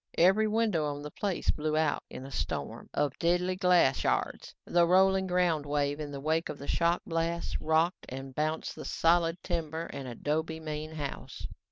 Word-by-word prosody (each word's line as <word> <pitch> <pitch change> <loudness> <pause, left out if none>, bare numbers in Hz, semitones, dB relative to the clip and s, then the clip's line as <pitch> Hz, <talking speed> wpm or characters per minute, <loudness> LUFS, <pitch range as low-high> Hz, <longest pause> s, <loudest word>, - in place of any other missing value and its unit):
Every 195 +6 +5
window 215 -7 +1
on 145 0 -4
the 150 - -6
place 195 +1 -1
blew 155 0 -1
out 155 -2 +1
in 130 - -8
a 135 - -9
storm - - -4
of 145 -2 -1
deadly 180 +2 +2
glass 180 -8 +4
shards. - - -1
The 175 -1 +3
rolling 190 +1 +4
ground 180 -4 +2
wave 145 0 0
in 150 -1 -4
the 140 - -5
wake 160 +3 0
of - - -5
the 140 - -9
shock 170 +1 +1
blast, 165 0 -1
rocked 160 +3 +1
and 135 +1 -7
bounced 155 +3 -2
the - - -7
solid, 165 0 +2
timber 165 -1 -2
and 135 -2 -6
adobe 160 +6 -2
main 155 0 -5
house. 145 -3 -6
160 Hz, 180 wpm, -30 LUFS, 150-175 Hz, -, Every